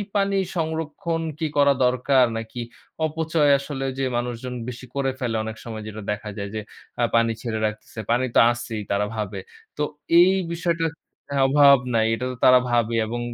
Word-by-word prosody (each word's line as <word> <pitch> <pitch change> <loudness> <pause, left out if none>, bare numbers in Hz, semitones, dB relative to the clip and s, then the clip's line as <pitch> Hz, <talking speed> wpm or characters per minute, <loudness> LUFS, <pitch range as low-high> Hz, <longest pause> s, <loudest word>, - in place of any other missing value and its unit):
পানি 200 -1 +2 0.2
সংরক্ষণ 160 +1 -2 0.2
কি 160 - 0
করা 140 -1 +5
দরকার? 125 +1 +3
নাকি 115 +2 -6 0.4
অপচয় 155 -1 +1
আসলে 140 -1 -5
ঐযে 135 +1 -2
মানুষজন 125 +1 -4 0.2
বেশি 125 +1 -8
করে 135 -1 0
ফেলে 120 -4 -2
অনেক 110 0 -6
সময় 110 -2 -6
যেটা 110 0 -7
দেখা 105 0 -4
যায় 100 0 -4
যে 110 - -2 0.4
আ - - +3
পানি 115 0 +3
ছেড়ে 110 -2 -3
রাখতেছে। 110 +1 -5
পানি 125 +2 +2
তো - - +7
আছেই 120 -2 -5
তারা 100 +1 +1
ভাবে, 105 -2 -4 0.4
তো 150 - 0 0.4
এই 185 +2 +6 0.2
বিষয়টা 170 -1 0 0.6
অভাব 140 0 +7 0.2
নাই। 110 -1 +3
এটা 125 - -4
তো - - -6
তারা 125 0 +8
ভাবে 115 -1 +2
এবং 120 +2 -4
125 Hz, 170 wpm, -23 LUFS, 115-145 Hz, 0.6 s, তারা